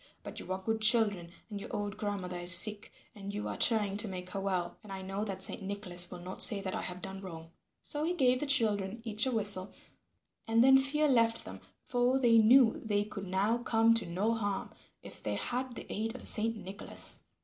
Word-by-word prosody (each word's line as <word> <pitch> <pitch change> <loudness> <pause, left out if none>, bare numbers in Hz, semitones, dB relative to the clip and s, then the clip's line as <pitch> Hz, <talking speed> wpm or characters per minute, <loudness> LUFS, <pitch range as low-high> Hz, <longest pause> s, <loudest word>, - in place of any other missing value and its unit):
But - - -6
you - - -8
are 185 - -1
good 220 +3 -3
children 215 -6 +4 0.2
and 205 -1 -6
your - - -9
old 205 0 -4
grandmother 200 -4 -5
is 175 +1 +3
sick, 210 -1 +2 0.2
and 200 -1 -8
you 205 +1 -5
are - - -5
trying 210 -4 +3
to 215 +1 0
make 185 -1 -8
her 195 - -4
well, 185 -3 -3
and 210 -3 -13
I 190 -1 -7
know 195 +2 -4
that 195 -2 -3
Saint - - +1
Nicholas 190 -3 0
will 180 - -8
not 185 +2 -6
say 210 - +9
that 190 -1 -5
I - - -3
have 180 0 -8
done 195 0 -7
wrong." 165 -3 -10 0.3
So 295 0 -4
he 345 +3 -1
gave 255 -5 +2
the 295 - -3
children 215 -5 +1
each 220 +1 0
a - - -1
whistle, 205 -4 -1 0.8
and 225 +1 +3
then 265 +1 +6
fear 300 +3 0
left 230 -4 +1
them, - - -10 0.2
for 245 +1 0
they 235 -3 +4
knew 230 +1 +4
they 205 -2 0
could 200 -2 -8
now 200 +6 0
come 230 -1 +2
to 230 - 0
no 195 +7 -1
harm 205 -3 -4 0.3
if - - -11
they - - -3
had 250 0 -4
the - - -9
aid 225 +3 -4
of 255 - -10
Saint 225 +1 +1
Nicholas. 195 -1 -1
210 Hz, 220 wpm, -31 LUFS, 190-230 Hz, 0.8 s, say